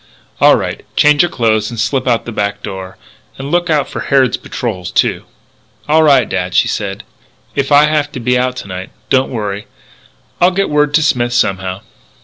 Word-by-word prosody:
"All -, -, +6 dB
right. -, -, -4 dB
Change 150 Hz, 0 st, +5 dB
your 175 Hz, -, +2 dB
clothes 110 Hz, -4 st, 0 dB
and 120 Hz, -2 st, -7 dB
slip 130 Hz, +4 st, -1 dB
out 120 Hz, -2 st, +1 dB
the 120 Hz, -, -5 dB
back 100 Hz, -2 st, -3 dB
door. 95 Hz, -2 st, -7 dB, 0.4 s
And 135 Hz, +2 st, -6 dB
look 175 Hz, 0 st, +1 dB
out 150 Hz, -3 st, +1 dB
for -, -, -6 dB
Harrod's 135 Hz, -2 st, +2 dB
patrols, 95 Hz, -7 st, -5 dB
too." -, -, 0 dB, 0.6 s
"All 155 Hz, +2 st, +4 dB
right, 140 Hz, -5 st, +4 dB
dad," 90 Hz, -1 st, -3 dB
she -, -, +4 dB
said. 100 Hz, -1 st, -4 dB, 0.5 s
"If 140 Hz, 0 st, -2 dB
I 145 Hz, +1 st, +7 dB
have 150 Hz, -1 st, 0 dB
to -, -, -5 dB
be 125 Hz, +1 st, +1 dB
out 125 Hz, 0 st, 0 dB
to 125 Hz, -, -7 dB
night, 95 Hz, -1 st, -6 dB, 0.2 s
don't 130 Hz, 0 st, +3 dB
worry. 105 Hz, -4 st, -4 dB, 0.7 s
I'll 175 Hz, -, +6 dB
get 195 Hz, -1 st, -1 dB
word 150 Hz, 0 st, +2 dB
to 160 Hz, -, +4 dB
Smith 120 Hz, -5 st, +1 dB
somehow." 95 Hz, -3 st, -1 dB
125 Hz, 190 wpm, -15 LUFS, 100-145 Hz, 0.7 s, I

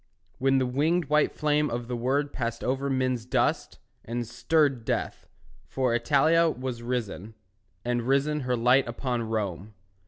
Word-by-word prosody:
When 135 Hz, +1 st, +3 dB
the 130 Hz, -, +2 dB
winged 155 Hz, +7 st, +1 dB
white 150 Hz, 0 st, +3 dB
flame 150 Hz, 0 st, +1 dB
of 120 Hz, 0 st, -4 dB
the 125 Hz, -, -3 dB
word 135 Hz, +4 st, 0 dB
Passed 115 Hz, -2 st, -3 dB
over 135 Hz, +2 st, -1 dB
men's 130 Hz, -3 st, 0 dB
dust, 125 Hz, -, 0 dB, 0.3 s
and 120 Hz, +1 st, -3 dB
stirred 140 Hz, -1 st, +1 dB
Death; -, -, -3 dB, 0.4 s
for 130 Hz, -3 st, 0 dB
Italia 145 Hz, +8 st, +3 dB
was 125 Hz, -4 st, -5 dB
risen, 115 Hz, -3 st, -4 dB, 0.5 s
And 120 Hz, 0 st, 0 dB
risen 140 Hz, +3 st, +2 dB
her 125 Hz, -2 st, -1 dB
light 125 Hz, +3 st, +4 dB
upon 120 Hz, 0 st, -2 dB
Rome. 105 Hz, -3 st, -3 dB
125 Hz, 150 wpm, -27 LUFS, 120-140 Hz, 0.5 s, light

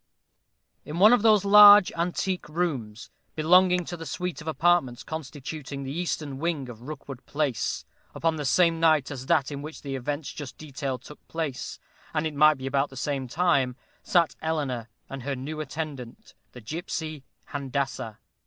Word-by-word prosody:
_ -, -, -56 dB, 0.8 s
In 150 Hz, -, -6 dB
one 210 Hz, +6 st, +7 dB
of 245 Hz, -, +4 dB
those 215 Hz, -3 st, +4 dB
large 205 Hz, -1 st, +9 dB
antique 180 Hz, +1 st, -2 dB
rooms, 130 Hz, -10 st, -3 dB, 0.2 s
belonging 180 Hz, +3 st, +4 dB
to 175 Hz, -, -5 dB
the 165 Hz, -2 st, -8 dB
suite 180 Hz, +3 st, -4 dB
of 155 Hz, -, -11 dB
apartments 150 Hz, -5 st, +2 dB
constituting 145 Hz, -1 st, -6 dB
the 135 Hz, -, -5 dB
eastern 150 Hz, -4 st, -3 dB
wing 155 Hz, -5 st, -2 dB
of 115 Hz, -2 st, -10 dB
Rookwood 135 Hz, -1 st, -8 dB
Place 145 Hz, -6 st, -1 dB, 0.3 s
upon 165 Hz, -1 st, +1 dB
the 150 Hz, -, -4 dB
same 165 Hz, +3 st, +3 dB
night 155 Hz, -4 st, +3 dB
as 130 Hz, -2 st, -7 dB
that 140 Hz, -1 st, +2 dB
in 140 Hz, -1 st, -5 dB
which 155 Hz, +2 st, -9 dB
the 140 Hz, -1 st, -4 dB
events 145 Hz, +3 st, -4 dB
just 145 Hz, -4 st, -8 dB
detailed 135 Hz, -4 st, -5 dB
took 150 Hz, -, -14 dB
place, 155 Hz, -6 st, -4 dB, 0.4 s
and 155 Hz, +1 st, +1 dB
it 155 Hz, -, -2 dB
might 150 Hz, +1 st, +5 dB
be 130 Hz, -, -7 dB
about 135 Hz, +1 st, +1 dB
the 135 Hz, -, -12 dB
same 135 Hz, -1 st, -2 dB
time, 135 Hz, -4 st, +1 dB, 0.3 s
sat 170 Hz, -6 st, +2 dB
Eleanor, 140 Hz, -8 st, -2 dB, 0.2 s
and 135 Hz, -1 st, -7 dB
her 140 Hz, +2 st, -3 dB
new 145 Hz, +5 st, -6 dB
attendant, 140 Hz, -5 st, -7 dB, 0.2 s
the 125 Hz, -, -10 dB
gipsy 155 Hz, -, -5 dB, 0.3 s
Handassah. 135 Hz, -5 st, -3 dB
150 Hz, 170 wpm, -26 LUFS, 135-165 Hz, 0.8 s, large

